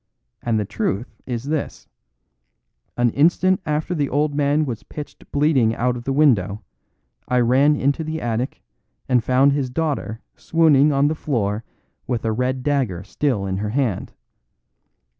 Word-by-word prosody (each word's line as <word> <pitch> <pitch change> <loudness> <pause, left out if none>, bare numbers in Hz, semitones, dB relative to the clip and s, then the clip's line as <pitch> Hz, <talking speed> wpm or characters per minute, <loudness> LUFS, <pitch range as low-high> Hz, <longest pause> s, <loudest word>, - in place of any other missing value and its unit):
And 115 -2 0
the 105 - -1
truth 105 +2 -3
is 120 -2 -3
this: 150 +1 -4 1.1
An 120 -1 +3
instant 175 +7 +3
after 150 +4 -1
the 145 -5 -1
old 145 +1 +1
man 145 +1 +2
was 120 -5 -4
pitched 150 -1 -10
bleeding 140 -6 +2
out 125 +1 0
of 120 -1 -8
the 135 - -1
window, 110 -8 +2 0.6
I 125 - +2
ran 135 +5 +4
into 140 +3 0
the 160 +1 -4
attic, 120 +1 -3 0.4
and 125 -3 +2
found 130 +4 +4
his 140 -3 -1
daughter 140 -6 -2 0.2
swooning 155 -2 +3
on 140 0 +3
the 155 - +1
floor 115 -8 -2 0.4
with 120 -2 -2
a 110 - +1
red 125 +3 -1
dagger 125 -12 0
still 105 0 -1
in 95 -1 -2
her 105 +1 -2
hand. 120 -4 -1
130 Hz, 155 wpm, -21 LUFS, 115-150 Hz, 1.1 s, ran